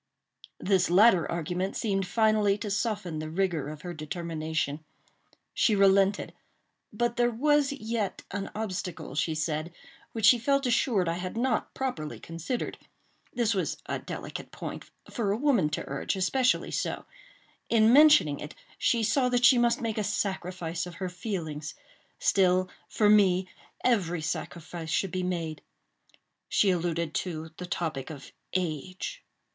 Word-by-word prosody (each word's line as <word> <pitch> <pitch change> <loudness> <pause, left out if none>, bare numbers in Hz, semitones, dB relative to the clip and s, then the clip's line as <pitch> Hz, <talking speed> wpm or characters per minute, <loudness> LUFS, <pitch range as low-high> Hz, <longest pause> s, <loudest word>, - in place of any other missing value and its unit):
This 190 -3 +2
latter 185 -1 +5
argument 175 +3 -2
seemed 195 -4 0
finally 215 0 +3
to 210 0 -5
soften 200 -7 -2
the 155 0 -5
rigor 165 -4 -1
of 150 0 -9
her 175 -1 -5
determination. 160 -2 -3 0.7
She 220 - +3
relented; 195 0 +3 0.6
but 240 +3 -1
there 240 0 +3
was 285 +4 +2
yet 225 -6 -3
an 195 0 -4
obstacle, 185 -8 -4
she 155 +2 0
said, 155 +1 -2 0.4
which 225 -2 0
she 240 +2 +7
felt 275 +3 +1
assured 230 -6 +2
I 165 +1 -1
had 185 +4 -5
not 255 +2 0
properly 205 -14 -3
considered. 165 +9 -4 0.5
This 230 -2 +1
was 190 - -1
a - - -3
delicate - - -7
point—for 215 -5 -5
a 205 - 0
woman 245 - +2
to 150 - -3
urge, 140 +8 -2
especially 250 +7 +1
so; - - -2 0.6
in 225 0 +5
mentioning 290 - +6
it, 150 - -8 0.2
she 235 -2 +2
saw 250 +4 +2
that 245 -1 +3
she 245 0 +7
must 240 0 +2
make 225 -2 -2
a - - 0
sacrifice 180 -4 -2
of 175 - -9
her 185 +1 -4
feelings; 170 -6 -5 0.4
still, 185 -1 +2 0.2
for 210 - +2
me, 190 -3 +5 0.4
every 175 -9 +1
sacrifice 165 +1 -5
should 185 +3 0
be 185 - -2
made. 170 -4 -3 0.9
She 200 - +3
alluded 170 -2 -1
to 160 -3 -3
the 180 - -6
topic 160 -7 -3
of 150 -4 -9 0.2
age. 185 - -3
185 Hz, 145 wpm, -28 LUFS, 165-225 Hz, 0.9 s, she